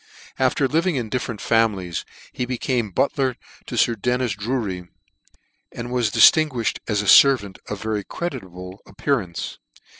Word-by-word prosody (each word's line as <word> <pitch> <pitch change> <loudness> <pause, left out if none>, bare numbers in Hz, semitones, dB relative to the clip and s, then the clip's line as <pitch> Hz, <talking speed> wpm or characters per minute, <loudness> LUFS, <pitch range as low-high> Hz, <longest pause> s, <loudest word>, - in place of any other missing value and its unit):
After 130 +1 +2
living 165 +4 +1
in 120 -4 -3
different 115 -2 -3
families, 100 -7 0 0.3
he 125 - -2
became 125 -2 -1
butler 130 +5 0 0.3
to - - -5
Sir 120 - +3
Dennis 125 +2 -1
Dutry, 100 -5 -3 0.8
and 120 +1 -7
was 125 -3 +1
diftinguifhed 135 0 +4
as 105 -1 0
a - - -6
fervant 105 -5 +5
of 105 -1 -5
very 110 -2 -2
creditable 95 - -7
appearance. 110 - -3
115 Hz, 130 wpm, -22 LUFS, 100-130 Hz, 0.8 s, fervant